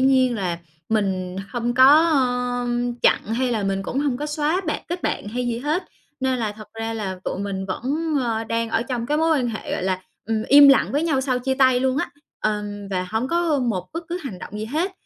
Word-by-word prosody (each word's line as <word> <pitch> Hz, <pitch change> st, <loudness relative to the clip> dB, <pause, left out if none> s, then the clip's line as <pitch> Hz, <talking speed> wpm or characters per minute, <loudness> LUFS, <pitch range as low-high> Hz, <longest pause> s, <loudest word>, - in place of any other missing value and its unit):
nhiên 260 Hz, -2 st, +4 dB
là 180 Hz, -5 st, -2 dB, 0.3 s
mình 190 Hz, -4 st, -1 dB
hông 240 Hz, 0 st, -2 dB
có, 260 Hz, +1 st, +7 dB, 0.2 s
ơ, 250 Hz, -5 st, +1 dB, 0.4 s
chặn -, -, +4 dB
hay 255 Hz, +1 st, 0 dB
là 215 Hz, -3 st, 0 dB
mình 195 Hz, 0 st, -1 dB
cũng 255 Hz, -, -3 dB
hông 280 Hz, -4 st, 0 dB
có 295 Hz, +2 st, -4 dB
xóa 305 Hz, +4 st, 0 dB
bạn 305 Hz, -, -2 dB
kết 350 Hz, +1 st, -4 dB
bạn 205 Hz, -, -2 dB
hay 245 Hz, +2 st, -2 dB
gì 235 Hz, -1 st, -1 dB
hết. 305 Hz, +8 st, -1 dB, 0.4 s
Nên 260 Hz, -1 st, +1 dB
là 215 Hz, -3 st, -1 dB
thật 215 Hz, 0 st, -12 dB
ra 225 Hz, 0 st, -3 dB
là 190 Hz, -4 st, -4 dB
tụi -, -, -3 dB
mình 195 Hz, -1 st, -3 dB
vẫn, 295 Hz, -, -2 dB
ờ, 225 Hz, -2 st, -1 dB
đang 230 Hz, 0 st, -1 dB
ở 225 Hz, +1 st, +1 dB
trong 240 Hz, -2 st, -3 dB
cái 300 Hz, -, +1 dB
mối 320 Hz, -1 st, +3 dB
quan 245 Hz, -2 st, 0 dB
hệ, 220 Hz, -, -5 dB
gọi -, -, -2 dB
là, 185 Hz, 0 st, -1 dB, 0.2 s
ừm, 220 Hz, -1 st, 0 dB
im 285 Hz, +1 st, +9 dB
lặng 275 Hz, -, +5 dB
với 290 Hz, +3 st, +1 dB
nhau 295 Hz, -5 st, +1 dB
sau 260 Hz, -2 st, 0 dB
chia 265 Hz, +1 st, -1 dB
tay 260 Hz, -2 st, +4 dB
luôn 260 Hz, 0 st, +1 dB
á, -, -, -2 dB, 0.3 s
ờ, 210 Hz, -1 st, 0 dB, 0.3 s
và 185 Hz, -1 st, -1 dB
hông 225 Hz, +4 st, -1 dB
có 335 Hz, -4 st, +1 dB
một 205 Hz, -8 st, -1 dB
bất 335 Hz, +1 st, -5 dB
cứ 350 Hz, +1 st, -2 dB
hành 210 Hz, -10 st, -6 dB
động 210 Hz, +3 st, -8 dB
gì 215 Hz, -, -3 dB
hết. 320 Hz, -, -1 dB
245 Hz, 235 wpm, -23 LUFS, 215-280 Hz, 0.4 s, im